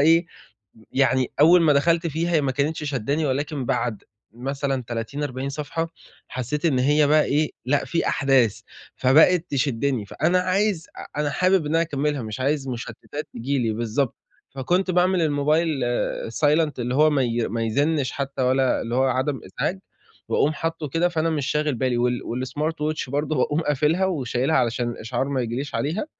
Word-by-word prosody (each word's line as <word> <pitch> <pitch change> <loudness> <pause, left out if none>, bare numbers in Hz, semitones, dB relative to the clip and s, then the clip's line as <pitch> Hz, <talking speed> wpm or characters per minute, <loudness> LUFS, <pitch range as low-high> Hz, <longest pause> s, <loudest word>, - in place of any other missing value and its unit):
إيه، 165 +3 +4 0.5
م 110 - -20
يعني 130 -1 +2
أول 170 +3 +7
ما 155 -2 +5
دخلت 165 +4 +2
فيها 165 +1 0
ما 140 -2 -1
كانتش 150 +4 -1
شدّاني 145 +2 -1
ولكن 140 +1 -2
بعد 120 -4 -1 0.3
مثلًا 135 +2 -2
30، 120 +5 -4
40 135 -1 -3
صفحة 150 +3 -3 0.4
حسيت 130 +5 -4
إن 145 -6 +3
هي 145 +3 +3
بقى 150 +1 +4
إيه، 150 +2 +1
لأ 140 +3 +1
في 170 - -1
أحداث، 135 -6 +2 0.3
فبقت 160 +6 +4
تشدّني، 130 -4 0
فأنا 180 - +1
عايز 185 -1 0
أ 150 - -6
أنا 150 -1 0
حابب 185 +2 +2
إن 150 - -1
أنا 165 - +4
أكملها 145 -3 -1
مش 110 +1 -6
عايز 140 +1 0
مشتتات 130 +4 -6
تيجي 135 +4 -2
لي، 115 -3 0
بالضبط. 120 +4 -1 0.3
فكنت 175 +8 0
باعمل 180 +1 +2
الموبايل 155 +2 +2 0.6
silent 150 +4 +2
اللي 125 +1 -2
هو 155 +3 +5
ما 145 -3 +2
ي 120 -2 0
ما 115 +2 -2
يزنّش 140 +4 0
حتى 140 -1 -3
ولا 130 0 +2
اللي 115 - -4
هو 130 +1 +3
عدم 130 0 0
إزعاج، 150 - -3 0.5
وأقوم 150 - +2
حاطه 165 -1 -3
كده 165 +6 +1
فأنا 165 -1 0
مش 150 -4 -1
شاغل 150 0 0
بالي 125 0 0
وال 125 0 +1
والsmart 130 +6 -3
watch 155 -3 -3
برضه 145 +2 -1
باقوم 145 +4 +1
قافلها 150 +4 +1
وشايلها 140 -3 0
علشان 120 0 +1
الإشعار 120 +3 -3
ما 140 -2 -1
ييجي 120 -1 -3
ليش 140 +2 -5
عليها 160 - -1
140 Hz, 175 wpm, -23 LUFS, 130-155 Hz, 0.6 s, أول